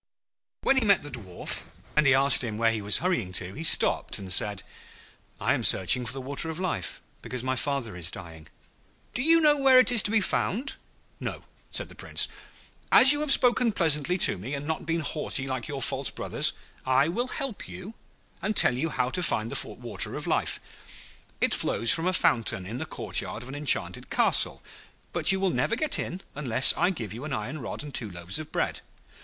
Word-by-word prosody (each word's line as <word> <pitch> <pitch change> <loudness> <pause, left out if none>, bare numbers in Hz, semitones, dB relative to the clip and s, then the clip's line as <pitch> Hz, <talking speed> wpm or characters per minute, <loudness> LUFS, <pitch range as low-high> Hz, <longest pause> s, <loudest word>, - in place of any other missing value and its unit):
When 270 - +2
he 260 - +2
met 200 -6 +2
the 145 - -9
Dwarf, 95 -8 -4 0.3
and 150 -1 +3
he 135 - +5
asked 135 0 +5
him 110 -3 -5
where 115 0 +1
he 110 -2 -4
was 105 +1 +3
hurrying 120 - -1
to, 90 0 -3
he 160 - -8
stopped - - +3
and 95 -2 -2
said, 100 0 +1 0.8
'I - - 0
am - - -3
searching 120 +7 +4
for - - 0
the 135 - -5
Water 140 +5 -1
of 160 +1 -6
Life, 170 - -4 0.2
because 125 -1 -4
my 130 0 -2
father 130 -6 -3
is 85 -2 -2
dying.' 80 -4 -10 0.7
'Do 250 - -2
you 330 +4 +4
know 300 -2 +3
where 265 -1 +5
it 255 0 +4
is 235 -3 +7
to - - -1
be 220 +1 +2
found?' 235 +5 -2 0.4
'No,' - - -7 0.3
said - - -1
the - - -14
Prince. - - 0 0.6
'As 265 - +10
you 290 - +4
have 300 -2 -2
spoken 245 -2 +3
pleasantly 165 -2 +1
to 100 - +3
me, 125 +10 -6
and 140 +1 -7
not 160 +1 -5
been 165 0 -1
haughty 150 -3 0
like 130 -3 -5
your 140 -2 -5
false - - -2
brothers, - - +2 0.3
I 130 +2 +1
will 235 +10 -3
help 260 -4 -6
you 190 +4 -10 0.5
and 210 +4 -3
tell 125 - +5
you 160 +6 -3
how 125 -3 -2
to 180 - -3
find 115 -9 -2
the - - -2
Water - - -1
of - - -6
Life. - - -2 0.8
It - - +1
flows 115 +3 +5
from 165 +2 0
a - - +1
fountain 110 - 0
in 115 +6 -7
the - - -6
courtyard 115 - -3
of 125 - -11
an - - -9
enchanted 145 -1 0
castle; - - +2 0.5
but - - +3
you 190 - +1
will 190 -1 0
never 230 - -1
get 300 +4 +1
in 180 +2 -6
unless 130 -3 +5
I - - +1
give 115 - -6
you 120 +5 -9
an 150 -2 -6
iron 125 +7 -5
rod 120 - -6
and 145 -2 -10
two 110 - -3
loaves 85 - -5
of 155 - -10
bread. - - -3
140 Hz, 210 wpm, -25 LUFS, 115-190 Hz, 0.8 s, As